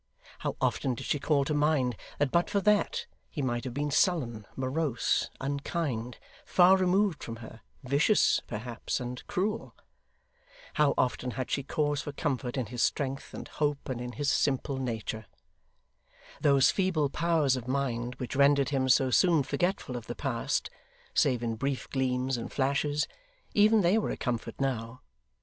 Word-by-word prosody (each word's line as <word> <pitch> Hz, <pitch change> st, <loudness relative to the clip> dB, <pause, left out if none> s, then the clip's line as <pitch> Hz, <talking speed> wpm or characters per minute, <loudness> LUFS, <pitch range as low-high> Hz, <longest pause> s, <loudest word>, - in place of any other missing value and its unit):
How -, -, -2 dB
often 130 Hz, -2 st, 0 dB
did -, -, -7 dB
she 145 Hz, -, 0 dB
call 140 Hz, -1 st, +2 dB
to 150 Hz, -, -1 dB
mind 145 Hz, -5 st, +2 dB, 0.2 s
that 145 Hz, -2 st, +1 dB
but 170 Hz, 0 st, +2 dB
for 200 Hz, -, +1 dB
that, 210 Hz, 0 st, +2 dB, 0.2 s
he 145 Hz, -, -4 dB
might 120 Hz, -1 st, -1 dB
have 125 Hz, -, -4 dB
been 145 Hz, +1 st, -1 dB
sullen, 130 Hz, -, +1 dB
morose, 130 Hz, 0 st, 0 dB
unkind, 140 Hz, -4 st, -3 dB, 0.3 s
far 185 Hz, +1 st, +6 dB
removed 190 Hz, -1 st, +2 dB
from 115 Hz, -, -5 dB
her 115 Hz, 0 st, -11 dB, 0.2 s
vicious, 140 Hz, -, +3 dB
perhaps, 115 Hz, +2 st, -4 dB
and 125 Hz, 0 st, -6 dB
cruel! 210 Hz, +4 st, -2 dB, 1.0 s
How 150 Hz, -3 st, +3 dB
often 125 Hz, 0 st, 0 dB
had 130 Hz, -, -3 dB
she 140 Hz, -, +1 dB
cause 145 Hz, +1 st, -1 dB
for 145 Hz, -, -6 dB
comfort, 135 Hz, -3 st, -2 dB
in 130 Hz, -, 0 dB
his 120 Hz, +2 st, -4 dB
strength, 135 Hz, -1 st, -1 dB
and -, -, -7 dB
hope, 145 Hz, -2 st, -2 dB
and 125 Hz, -2 st, -3 dB
in 125 Hz, 0 st, -5 dB
his 140 Hz, +4 st, 0 dB
simple 135 Hz, 0 st, 0 dB
nature! 110 Hz, -4 st, -4 dB, 1.1 s
Those 140 Hz, -2 st, +5 dB
feeble 170 Hz, -7 st, +1 dB
powers 160 Hz, -5 st, +2 dB
of 125 Hz, -2 st, -6 dB
mind 125 Hz, -2 st, -1 dB
which 125 Hz, +2 st, -5 dB
rendered 140 Hz, 0 st, +4 dB
him 135 Hz, -2 st, 0 dB
so 130 Hz, 0 st, +4 dB
soon 165 Hz, -1 st, +4 dB
forgetful 175 Hz, -4 st, -1 dB
of 120 Hz, -2 st, -6 dB
the 120 Hz, -, -5 dB
past, 130 Hz, -5 st, -2 dB, 0.4 s
save 120 Hz, -2 st, +2 dB
in 115 Hz, -1 st, -2 dB
brief 135 Hz, +2 st, -2 dB
gleams 130 Hz, -1 st, 0 dB
and 115 Hz, -, -6 dB
flashes, 145 Hz, +2 st, 0 dB, 0.5 s
even 215 Hz, +1 st, +5 dB
they 185 Hz, +5 st, +4 dB
were -, -, -2 dB
a -, -, -3 dB
comfort 120 Hz, -3 st, -3 dB
now. 125 Hz, -3 st, -2 dB
135 Hz, 165 wpm, -29 LUFS, 125-150 Hz, 1.1 s, far